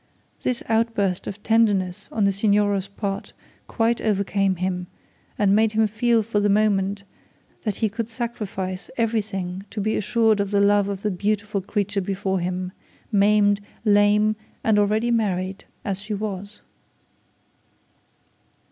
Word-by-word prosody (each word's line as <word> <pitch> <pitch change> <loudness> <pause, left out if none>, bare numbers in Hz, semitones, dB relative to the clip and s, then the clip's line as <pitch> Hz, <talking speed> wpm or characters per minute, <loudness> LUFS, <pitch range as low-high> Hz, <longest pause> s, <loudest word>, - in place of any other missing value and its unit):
This 250 -2 -1
outburst 220 -5 0
of 205 +1 -7
tenderness 205 -4 +2
on 215 - 0
the 200 - +4
Signora's 200 -1 +2
part 200 0 -4 0.3
quite 230 0 +1
overcame 200 -2 +1
him, 180 0 -2 0.5
and 200 -1 +3
made 220 0 +3
him 220 0 +3
feel 225 +2 +2
for 210 -1 0
the 205 0 +2
moment 200 -1 +2 0.6
that 210 -3 0
he 220 - +1
could 225 +2 -4
sacrifice 210 -6 -4
everything 200 -5 -1
to 215 - -6
be 215 +2 0
assured 220 0 +2
of 200 -1 0
the 200 0 +2
love 200 0 +4
of 195 -1 -4
the 210 - +1
beautiful 205 +1 -1
creature 205 +1 -1
before 190 0 -1
him, 180 +1 -3 0.4
maimed, 205 0 +4 0.2
lame, 210 +1 +4 0.3
and 215 -2 +3
already 215 +3 +2
married 195 -4 -1 0.2
as 200 -2 -2
she 210 0 -4
was. 205 0 -5
205 Hz, 140 wpm, -23 LUFS, 195-215 Hz, 0.6 s, the